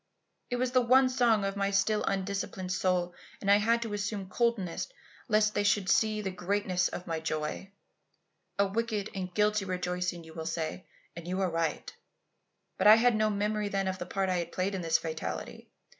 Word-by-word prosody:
It 245 - -1
was 250 0 0
the 255 0 +4
one 255 +2 +5
song 235 -5 +2
of 195 0 -2
my 200 0 0
still 200 +2 +1
undisciplined 195 -1 -2
soul, 180 -2 0 0.3
and 200 - +1
I 200 - +8
had 230 +3 +2
to 225 -3 -5
assume 205 -2 -3
coldness 220 -5 0 0.4
lest 215 -2 +3
they - - +1
should 205 -2 +2
see 215 -1 +2
the 190 - -2
greatness 185 0 0
of 180 - -6
my 165 -2 -2
joy. 155 +3 -3 0.9
A 200 - +4
wicked 215 0 -2
and 185 -2 -4
guilty 210 +1 +2
rejoicing 180 -1 -2
you 160 0 -13
will 160 -1 -5
say, 165 +2 -4 0.3
and 170 0 -8
you 185 +1 -2
are 185 -2 +1
right. 165 0 -2 0.8
But - - +4
I 215 - +11
had 235 +1 +4
no 215 0 +2
memory 210 0 -1
then 195 -1 -1
of 185 0 -2
the - - -5
part 195 -1 -1
I 185 -1 +1
had 170 -1 -3
played 185 +2 -1
in 190 - -3
this 165 -1 +3
fatality. 160 -1 -5
195 Hz, 195 wpm, -30 LUFS, 180-215 Hz, 0.9 s, I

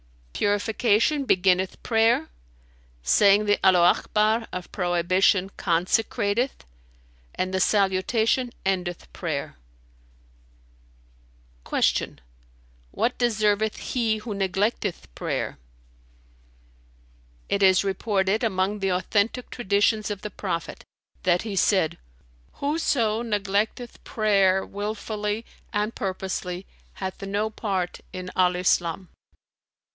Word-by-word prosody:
"Purification 220 +7 +1
beginneth 185 -3 +2
prayer, 225 -6 +3 0.8
saying 200 - +5
the 205 0 +3
Allaho 180 -2 +5
Akbar 220 +2 +1
of 180 -1 -6
prohibition 185 +2 +2
consecrateth, 205 - 0 0.7
and 185 0 -2
the 190 - +1
salutation 210 +6 +2 0.2
endeth 180 -2 -2
prayer." 150 - -4 2.1
Q - - +1 0.7
"What 245 - -1
deserveth 215 -3 +1 0.2
he 225 -3 +1
who 215 0 -6
neglecteth 195 0 -1
prayer?" - - -3 1.9
"It 200 - 0
is 190 -1 +5
reported, 195 +1 0
among 200 -1 0
the 195 -1 0
authentic 205 +6 0
Traditions 215 -1 +1
of 205 -2 -4
the 210 - -5
Prophet, 175 -5 -4 0.4
that 175 -1 +2
he 215 -3 -4
said, 190 -4 +2 0.5
'Whoso 265 -7 0
neglecteth 210 +2 -2
prayer 195 -3 +2
wilfully 210 +1 -4 0.3
and 210 +2 -1
purposely 185 -1 -4 0.3
hath 190 0 -6
no 205 +2 -2
part 190 -5 -3
in 185 0 -6
Al 180 -1 +3
Islam.'" 180 0 0
200 Hz, 95 wpm, -25 LUFS, 185-220 Hz, 2.1 s, saying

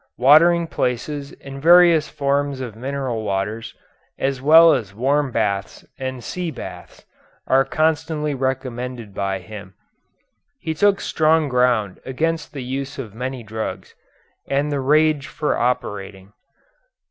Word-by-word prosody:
Watering 165 +6 +5
places 140 0 -3
and 135 0 -9
various 170 -1 +6
forms 140 -1 -1
of 120 -5 -6
mineral 130 -1 -3
waters, 105 +3 -3 0.4
as 135 -1 -2
well 160 +3 +7
as 105 -7 -3
warm 140 +4 +1
baths 100 -3 -2
and 130 -2 -5
sea 180 -2 -4
baths, - - -10 0.4
are 135 +1 +4
constantly 155 +1 0
recommended 125 -4 -4
by 95 0 -2
him. 100 -1 -11 0.8
He 165 -10 -4
took 200 +5 +2
strong 155 -1 +2
ground 125 -6 +1
against 160 +5 -2
the 140 -3 -6
use 135 +2 -5
of 115 -7 -7
many 125 +1 -5
drugs, 110 -4 -6 0.6
and 140 +2 0
the 145 - -1
rage 150 +1 +2
for 150 0 -1
operating. 100 -5 -3
135 Hz, 125 wpm, -21 LUFS, 115-150 Hz, 0.8 s, well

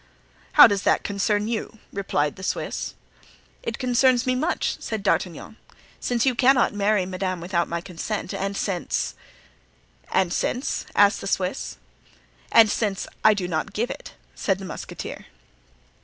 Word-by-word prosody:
"How - - +11
does 200 -3 +2
that - - +2
concern 205 +1 0
you?" 225 0 -3 0.2
replied 150 -7 0
the - - -11
Swiss. 190 - -3 0.7
"It - - -4
concerns 255 0 +3
me 255 - +2
much," 290 +7 0
said 220 -3 -4
D'Artagnan, 190 +2 -1 0.4
"since 240 0 0
you 260 - +3
cannot 255 0 +4
marry 205 -1 +2
madame 185 -1 -3
without 170 0 0
my 170 0 -3
consent 185 +4 -4
and 195 0 -2
since——" 185 -4 -1 1.0
"And 185 -2 +2
since?" 255 +3 -1
asked 205 0 +5
the - - -5
Swiss. 190 +4 -2 0.7
"And 225 -1 +8
since—I 210 0 +1
do 185 -3 -2
not 170 +4 -2
give 235 +5 -1
it," - - -9 0.2
said 195 -2 0
the 195 - -8
musketeer. - - -7
200 Hz, 140 wpm, -24 LUFS, 185-230 Hz, 1.0 s, How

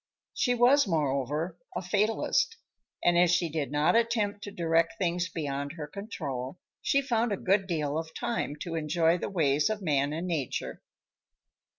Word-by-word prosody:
She 245 -1 +1
was, 250 +2 +5
moreover, 150 +1 -1 0.2
a 180 - -1
fatalist, 210 - +1 0.5
and 175 0 +5
as 175 0 +5
she 175 -1 +2
did 150 -3 -3
not 150 +7 +3
attempt 220 -3 +1
to 205 - -7
direct 165 -3 +1
things 175 -1 0
beyond 140 -3 -3
her 160 -3 -6
control, 145 - -5 0.2
she 275 0 +2
found 235 -3 +1
a 200 - 0
good 195 +1 +1
deal 155 -4 -1
of 160 0 -8
time 225 -10 -2
to 170 - -4
enjoy 165 +2 +2
the - - -3
ways 150 -5 +2
of 215 -2 -3
man 145 -3 +1
and 165 +3 -3
nature. 155 -7 -3
170 Hz, 165 wpm, -29 LUFS, 150-205 Hz, 0.5 s, was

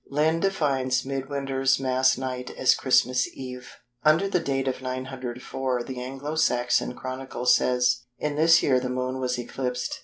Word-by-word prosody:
Lynn 155 +3 +2
defines 135 -9 0
"Mid 135 0 -4
winter's 135 -2 0
Mass 130 -1 +2
night" 125 -1 -4
as 130 - +5
Christmas 125 -1 +2
Eve. 125 -1 -8 0.3
Under 155 +6 +4
the 190 -2 +1
date 135 -3 -1
of 130 - -2
904 130 -1 -4
the 125 0 -6
Anglo 135 +4 -5
Saxon 125 -4 +1
Chronicle 130 -1 -6
says:—"In 125 +2 +1
this 165 +2 +5
year 130 -2 +3
the 125 0 -3
Moon 130 +1 -2
was 125 -1 -1
eclipsed." 125 +1 -3
130 Hz, 150 wpm, -25 LUFS, 125-135 Hz, 0.3 s, as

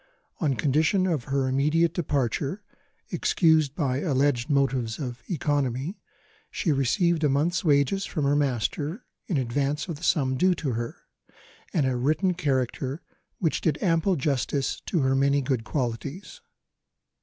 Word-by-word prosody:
On 140 -4 +1
condition 155 - +2
of 160 -9 -1
her 135 -1 0
immediate 150 +5 +2
departure 145 - -1 0.5
(excused 160 -5 +2
by 135 -5 0
alleged 140 -4 +1
motives 135 -5 +1
of 125 -4 -5
economy), 145 - -1 0.5
she 165 - -1
received 155 - +1
a 150 - +4
month's 155 +6 +1
wages 150 +5 +2
from 155 - -2
her 140 +1 +3
master, 145 - -1 0.2
in 175 - 0
advance 140 +5 -1
of 165 -4 -4
the 160 - -14
sum 130 -6 +2
due 185 +5 +3
to 150 -5 -2
her, 115 0 -3 0.8
and 150 -5 +1
a 130 -1 +1
written 155 +9 +1
character 135 -2 -2 0.3
which 165 -4 0
did 155 -3 +1
ample 175 +1 +2
justice 140 -1 -1
to 170 - +1
her 130 0 +2
many 140 +1 +3
good 130 -4 -1
qualities. 135 - -4
145 Hz, 145 wpm, -26 LUFS, 130-165 Hz, 0.8 s, a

